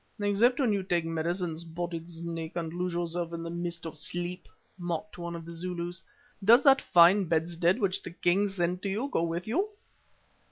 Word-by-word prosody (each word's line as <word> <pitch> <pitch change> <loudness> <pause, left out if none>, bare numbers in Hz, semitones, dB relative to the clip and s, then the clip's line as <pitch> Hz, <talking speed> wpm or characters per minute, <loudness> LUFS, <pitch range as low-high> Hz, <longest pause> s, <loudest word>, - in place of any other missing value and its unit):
"Except 210 +5 +3
when 245 -6 +3
you 200 - 0
take 175 -3 0
medicine, 165 +1 -1
Spotted 170 0 -5
Snake, 165 -1 -5
and 165 -2 -3
lose 180 +1 -2
yourself 170 0 -2
in 165 0 -4
the 165 - -5
mist 170 0 -4
of 160 -2 -6
sleep," 175 +2 -4 0.3
mocked 175 +3 -4
one 170 0 -4
of 165 -1 -7
the 170 - -8
Zulus. 175 +1 -3 0.4
"Does 235 +6 +7
that 275 -1 +6
fine 180 +3 +6
bedstead 170 +2 +1
which 195 -4 +1
the - - -7
king 180 +3 +2
sent 180 -2 -2
you 210 +7 -1
go - - +2
with 170 +1 -2
you?" 370 - +1
175 Hz, 185 wpm, -29 LUFS, 170-190 Hz, 0.4 s, Does